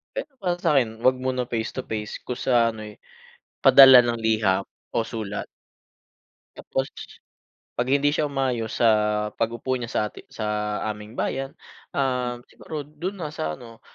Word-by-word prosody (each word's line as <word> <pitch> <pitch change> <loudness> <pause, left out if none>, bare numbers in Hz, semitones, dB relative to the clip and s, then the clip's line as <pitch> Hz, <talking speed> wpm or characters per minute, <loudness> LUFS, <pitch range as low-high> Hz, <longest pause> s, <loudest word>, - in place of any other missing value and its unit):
Pero 315 - -5
para 175 -1 0
sakin, 120 -9 +1
'wag 130 +2 +4
muna 130 -1 -1
face 115 -2 -2
to - - -5
face 105 -1 -4
kung 125 - -5
sa 120 -2 +3
ano, 110 -1 -7
eh, 105 -1 -11 0.6
padala 130 -2 +10
ng 120 -1 -1
liham 110 -4 +1 0.2
o - - 0
sulat. 105 -3 -4 1.1
Tapos, 135 0 -2 0.9
pag 125 +1 0
hindi 140 +1 +3
siya 150 -1 0
umayos 130 -5 -2
sa 120 - +3 0.5
pag-upo 115 +3 -1
niya 120 -2 -5
sa - - 0
ati - - -13
sa 110 - -6 0.5
aming 105 +2 -11
bayan, 135 +1 -2 0.4
ah, 125 -3 0
siguro 150 -3 -7
dun 175 +7 -6
na 150 -2 -4
sa 80 - -3
ano, 115 -2 -13
125 Hz, 155 wpm, -24 LUFS, 110-135 Hz, 1.1 s, padala